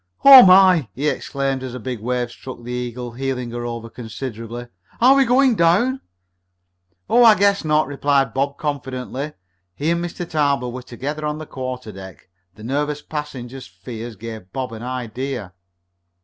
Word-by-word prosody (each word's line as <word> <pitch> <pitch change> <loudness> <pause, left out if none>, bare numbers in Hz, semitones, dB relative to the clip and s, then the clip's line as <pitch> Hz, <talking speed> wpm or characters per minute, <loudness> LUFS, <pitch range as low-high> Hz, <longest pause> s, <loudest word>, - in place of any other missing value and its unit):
"Oh, 270 -2 +12
my!" 185 - +6
he 145 +4 -1
exclaimed 135 -2 -2
as 130 -1 -6
a - - -5
big 125 0 -5
wave 120 +1 -2
struck 130 -1 -10
the 120 - -7
Eagle, 125 0 -4
heeling 125 -1 -3
her 120 0 -4
over 115 -1 -6
considerably. 115 0 -7 0.3
"Are 255 +3 +7
we 275 -1 +4
going 255 +1 +4
down?" 210 +9 +2 1.1
"Oh, 240 +1 +5
I 225 -2 +8
guess 200 0 +2
not," 155 -1 +2
replied 140 0 +1
Bob 140 +1 -1
confidently. 140 -1 -4 0.4
He 150 - -1
and 170 0 0
Mr. 175 0 -5
Tarbill 140 -6 0
were 130 +1 -6
together 140 +5 -6
on 150 0 -2
the 155 - -7
quarterdeck. 110 - -8 0.3
The 110 - -13
nervous 145 +4 -2
passenger's 135 -5 -7
fears 110 +6 -8
gave 110 -3 -9
Bob 130 -1 -4
an 110 - -8
idea. 125 -3 -5
130 Hz, 160 wpm, -21 LUFS, 120-150 Hz, 1.1 s, Oh